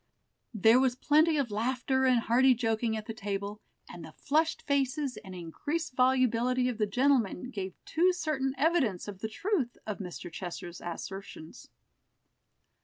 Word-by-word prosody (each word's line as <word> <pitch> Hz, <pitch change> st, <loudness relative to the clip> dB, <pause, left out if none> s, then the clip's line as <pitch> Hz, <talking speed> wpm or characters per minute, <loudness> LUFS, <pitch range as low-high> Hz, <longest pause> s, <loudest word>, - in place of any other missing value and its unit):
There 220 Hz, +4 st, +6 dB
was 260 Hz, -2 st, +2 dB
plenty 310 Hz, +4 st, +3 dB
of 270 Hz, -6 st, -1 dB
laughter 255 Hz, +4 st, 0 dB
and 250 Hz, -2 st, +4 dB
hearty 255 Hz, +3 st, +4 dB
joking 225 Hz, -1 st, 0 dB
at 215 Hz, -, -6 dB
the 225 Hz, -, -5 dB
table, 205 Hz, 0 st, -4 dB, 0.3 s
and 175 Hz, -, -10 dB
the 160 Hz, -1 st, -11 dB
flushed 315 Hz, +3 st, 0 dB
faces 275 Hz, -1 st, 0 dB
and 190 Hz, -3 st, -9 dB
increased 290 Hz, -, -4 dB
volubility 255 Hz, -1 st, +2 dB
of 235 Hz, -2 st, -5 dB
the 210 Hz, -, +2 dB
gentlemen 250 Hz, -1 st, +1 dB
gave 190 Hz, -5 st, -5 dB
too 350 Hz, +3 st, +3 dB
certain 305 Hz, -6 st, -2 dB
evidence 275 Hz, -, +1 dB
of 200 Hz, -2 st, -7 dB
the 220 Hz, -, -4 dB
truth 290 Hz, -, -1 dB
of 210 Hz, -2 st, -4 dB
Mr. 180 Hz, -2 st, -7 dB
Chester's 175 Hz, -1 st, -7 dB
assertions. 175 Hz, -1 st, -8 dB
245 Hz, 150 wpm, -30 LUFS, 205-270 Hz, 0.3 s, There